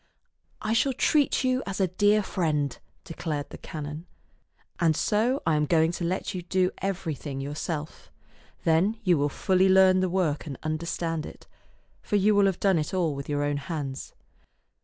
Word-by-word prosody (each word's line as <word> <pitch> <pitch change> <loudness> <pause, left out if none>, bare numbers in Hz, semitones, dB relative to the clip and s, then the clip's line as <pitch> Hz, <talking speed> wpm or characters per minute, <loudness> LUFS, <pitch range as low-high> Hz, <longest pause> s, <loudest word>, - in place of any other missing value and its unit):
" - - -42
I 215 - 0
shall 260 +4 +2
treat 285 +2 +2
you 255 0 +1
as 195 0 -4
a 190 - +4
dear 205 +4 +3
friend," 150 -7 -1 0.3
declared 155 -3 -4
the - - -9
canon, 150 +2 -7 0.3
" - - -40
and 160 -2 +3
so 230 +6 +1
I 160 - +3
am 150 0 +1
going 160 0 +3
to 175 - -5
let 185 +4 -2
you 185 - -4
do 180 +1 +1
everything 160 -8 -3
yourself. 145 - -5 0.5
Then 175 +7 +2
you 180 -4 +4
will 145 +1 +1
fully 185 +5 +2
learn 190 0 +6
the 185 0 +1
work 170 -5 0
and 135 -4 -6
understand 165 0 -2
it, - - -13 0.6
for - - -2
you 205 +1 +4
will 200 -1 +4
have 190 -2 -1
done 190 -4 +3
it 155 +4 -3
all 170 -5 +1
with 140 0 -7
your 145 0 0
own 145 0 0
hands." 140 -3 -5
170 Hz, 180 wpm, -27 LUFS, 150-195 Hz, 0.6 s, learn